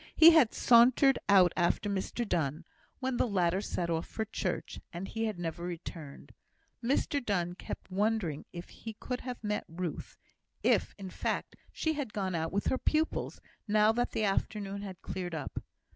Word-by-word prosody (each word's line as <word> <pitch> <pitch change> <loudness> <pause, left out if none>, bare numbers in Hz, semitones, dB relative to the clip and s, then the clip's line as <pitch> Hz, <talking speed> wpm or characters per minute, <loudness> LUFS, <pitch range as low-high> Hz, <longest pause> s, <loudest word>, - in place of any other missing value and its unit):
He 325 +1 +10
had 310 -9 +6
sauntered 250 +3 +5
out 185 -3 +6
after 175 +4 +1
Mr 200 +4 -2
Donne, 160 -2 -1 0.4
when 260 -1 -1
the - - +2
latter 185 -2 +1
set 175 -4 -2
off 165 0 -1
for 220 - -3
church, 220 - -3
and 175 +3 -5
he 225 0 -2
had 215 -4 -2
never 170 0 -4
returned. 165 -4 -7 0.5
Mr 280 +2 +1
Donne 175 -5 0
kept 185 - -8
wondering 195 -6 0
if 175 0 -8
he 225 - -8
could 250 +4 -5
have 250 -2 -6
met 210 0 -1
Ruth 170 -1 -5 0.5
if, - - +2
in 190 -2 -7
fact, - - -2 0.2
she 315 - -1
had 285 -8 -4
gone 190 -3 -2
out 160 -1 -1
with 200 +1 -1
her 260 - +1
pupils, 310 +1 0 0.3
now 210 +1 +5
that 240 +2 0
the 220 - -2
afternoon 200 0 -1
had 190 -4 -8
cleared 180 -3 -4
up. 150 - -5
200 Hz, 175 wpm, -31 LUFS, 175-230 Hz, 0.5 s, He